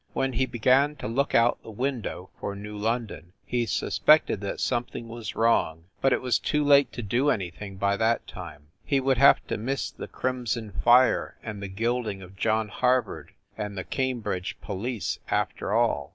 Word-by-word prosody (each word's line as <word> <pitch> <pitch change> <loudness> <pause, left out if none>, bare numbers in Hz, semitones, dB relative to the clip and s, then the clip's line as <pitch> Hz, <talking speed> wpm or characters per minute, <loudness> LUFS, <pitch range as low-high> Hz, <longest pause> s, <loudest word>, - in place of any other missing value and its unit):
When 135 -1 0
he 130 +3 +1
began 130 +5 +3
to - - -6
look 135 +6 0
out 115 +1 +3
the - - -12
window 115 -5 -4
for 100 - -4
New 105 +1 -8
London 105 -5 -3
he 120 -1 -1
suspected 150 -7 +3
that 100 - -4
something 120 -1 -2
was 115 -1 -7
wrong, 80 -8 +2 0.2
but 135 - +3
it - - +1
was 125 -2 +2
too 150 -1 0
late 140 -1 +5
to 120 - -5
do 125 +8 +1
any 95 -9 0
thing 100 +2 -9
by 100 +1 +1
that 115 +2 +1
time. 75 -4 -10
He 140 - +1
would 130 -1 +1
have 140 - +6
to - - -3
miss 135 +5 -2
the - - -8
crimson 120 -4 -3
fire 120 +6 +3
and 105 -3 -6
the 100 - -4
gilding 110 0 -2
of 95 +1 -13
John 110 +2 0
Harvard 125 -1 0 0.2
and 105 -2 -5
the 95 - -3
Cambridge 120 -9 -2
police 110 +3 -3
after - - -1
all. 70 -1 +1
115 Hz, 180 wpm, -26 LUFS, 100-130 Hz, 0.2 s, have